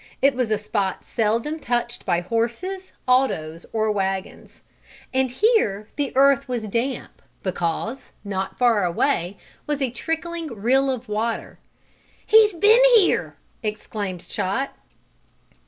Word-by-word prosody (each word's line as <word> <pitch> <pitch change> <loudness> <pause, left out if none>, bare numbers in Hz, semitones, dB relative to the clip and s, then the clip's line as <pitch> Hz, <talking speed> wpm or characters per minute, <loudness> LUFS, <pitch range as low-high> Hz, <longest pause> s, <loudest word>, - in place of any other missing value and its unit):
It 275 +1 +4
was 250 -3 -1
a 215 - +2
spot 205 -2 -2
seldom 230 +8 0
touched 240 -3 -2
by 175 -2 +2
horses, 235 - -2 0.2
autos 170 -11 +1
or 220 -1 +1
wagons. 195 -2 -4 0.5
And 260 0 +2
here 245 - +1
the 285 -2 -1
earth 275 0 +4
was 245 -3 -2
damp 240 +4 -3 0.2
because, 185 +7 -3
not 195 -2 -4
far 235 -5 +3
away, 175 +1 0 0.3
was 295 -1 -1
a 265 -4 0
trickling 325 +5 -3
rill 255 +3 +1
of 255 -2 -3
water. 220 +2 -3 0.7
"He's 430 -1 +6
been 425 +8 +5
here!" 410 -5 +3 0.3
exclaimed 210 -4 -4
Chot. 230 +9 -2
235 Hz, 120 wpm, -23 LUFS, 205-275 Hz, 0.7 s, He's